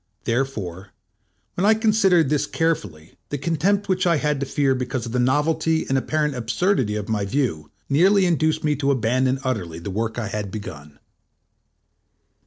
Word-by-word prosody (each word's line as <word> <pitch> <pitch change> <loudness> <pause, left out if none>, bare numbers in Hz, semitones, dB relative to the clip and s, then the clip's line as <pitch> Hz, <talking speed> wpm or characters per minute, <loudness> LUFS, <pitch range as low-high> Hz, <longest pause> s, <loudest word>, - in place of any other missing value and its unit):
Therefore, 105 -7 -3 0.6
when 180 - -2
I 215 +2 +5
considered 205 - +3
this 150 -1 +1
carefully, 105 - -2
the 145 - -2
contempt 170 +8 0
which 185 -1 +1
I 170 - +4
had 150 -1 0
to 140 - -3
fear 135 0 +1
because 125 -2 -3
of 115 - -6
the 125 - 0
novelty 160 +5 +1
and 135 - 0
apparent 150 +2 0
absurdity 125 - 0
of 105 -1 -4
my 110 -2 -1
view, 100 - -2 0.2
nearly 190 +7 +4
induced 155 -2 +1
me 150 -1 +1
to 140 -1 0
abandon 130 +1 +1
utterly 95 -11 -3
the 85 +4 -6
work 110 +3 -2
I 110 -3 -3
had 105 -1 -4
begun. 75 -8 -8
135 Hz, 165 wpm, -22 LUFS, 110-160 Hz, 0.6 s, I